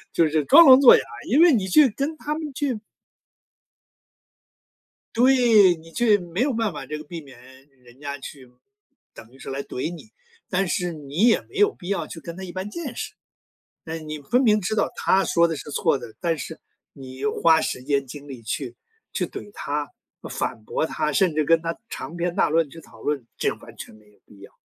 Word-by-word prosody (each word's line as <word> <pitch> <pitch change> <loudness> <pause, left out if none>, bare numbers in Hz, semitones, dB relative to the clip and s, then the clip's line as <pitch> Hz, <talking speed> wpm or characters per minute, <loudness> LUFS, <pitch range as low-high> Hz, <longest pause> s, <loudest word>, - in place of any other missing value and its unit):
就 165 -2 +3
是 155 -1 0
装 335 - +8
聋 260 -1 +10
作 270 -3 +9
哑， - - -1 0.3
因 275 +7 +4
为 345 -2 +7
你 200 -5 0
去 280 +9 +6
跟 280 +7 -3
他 300 - -3
们 305 -2 -5
去 265 -4 -2 2.4
对， 235 -6 +5
你 165 0 -16
去 220 +1 +3
没 175 +2 -4
有 275 +1 +1
办 225 -2 0
法 150 - -7
这 150 - -5
个 150 - -9
避 165 +2 -8
免 135 -4 -15 0.4
人 120 +1 -19
家 140 -1 -5
去 135 -1 -10 0.7
等 115 +2 -14
于 135 - -19
是 - - -8
来 135 +1 -4
怼 140 +6 -4
你， 175 +6 -12 0.4
但 190 +1 0
是 175 0 -1
你 150 - 0
也 230 - +4
没 - - -21
有 415 0 +4
必 175 - -12
要 195 -5 -1
去 - - -9
跟 165 +1 -8
他 190 - -7
一 180 - -7
般 185 +3 -5
见 290 +1 -6
识。 - - -5 0.7
那 160 0 -5
你 155 -1 -7
分 240 - +1
明 215 -4 +3
知 200 +4 -2
道 - - +1
他 195 0 +2
说 170 0 +3
的 165 - -3
是 - - -9
错 140 - +1
的， 110 - -10
但 165 -3 0
是 - - -7 0.3
你 130 -1 -8
花 165 -6 +4
时 125 - -3
间 140 0 0
精 145 +2 -10
力 130 -4 -9
去 120 +2 -4 0.4
去 - - -1
怼 205 - -9
他、 145 +1 -3 0.4
反 110 - -4
驳 130 - -1
他， 155 -1 -2
甚 170 +1 +2
至 155 - +2
跟 165 +2 +3
他 165 0 -4
长 165 - -7
篇 175 0 -2
大 - - +2
论 160 -1 +1
去 165 - -12
讨 - - -17
论， 145 -5 -2
这 - - +1
完 - - -14
全 - - -10
没 105 0 -21
有 105 - -28
必 100 - -19
要 100 - -13
165 Hz, 230 characters per minute, -23 LUFS, 145-215 Hz, 2.4 s, 聋